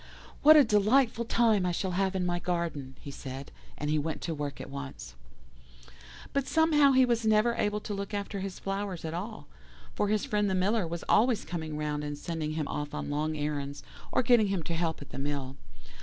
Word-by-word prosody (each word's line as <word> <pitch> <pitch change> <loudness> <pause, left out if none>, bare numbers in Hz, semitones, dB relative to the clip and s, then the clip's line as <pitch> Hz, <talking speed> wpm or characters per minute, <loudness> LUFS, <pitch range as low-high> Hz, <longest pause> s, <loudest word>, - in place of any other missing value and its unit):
"'What 310 +1 +9
a 295 - +8
delightful 230 +2 +3
time 225 -4 +3
I 180 - +1
shall 185 +2 -2
have 190 +1 0
in 185 -1 0
my 175 0 0
garden,' 170 -7 -3
he 140 - -7
said, 135 0 -7 0.3
and 150 - -3
he 150 0 +2
went 160 +1 -3
to 165 - -2
work 145 -2 -4
at - - -8
once. 140 - -7 1.2
"But 275 -1 0
somehow 300 -4 +4
he 260 0 +6
was 235 -2 +1
never 220 +2 +3
able 210 -2 0
to 205 - -5
look 200 0 -4
after 200 -1 -3
his 190 -1 -5
flowers 195 -3 -4
at 160 - -3
all, 180 -2 -5 0.5
for - - 0
his 210 0 +1
friend 210 -1 +1
the 190 - 0
Miller 195 +1 +1
was 170 +1 -5
always 235 -1 +3
coming 160 -3 -4
round 150 -1 -2
and 145 0 -4
sending 155 0 -3
him 155 -2 -2
off 145 0 -4
on - - -4
long 155 +1 -1
errands, 145 -1 -3 0.3
or - - +2
getting 230 -3 +5
him 195 -4 -1
to 170 - -3
help 165 -3 -1
at - - -15
the - - -6
mill. 140 -2 -3
180 Hz, 210 wpm, -29 LUFS, 150-215 Hz, 1.2 s, What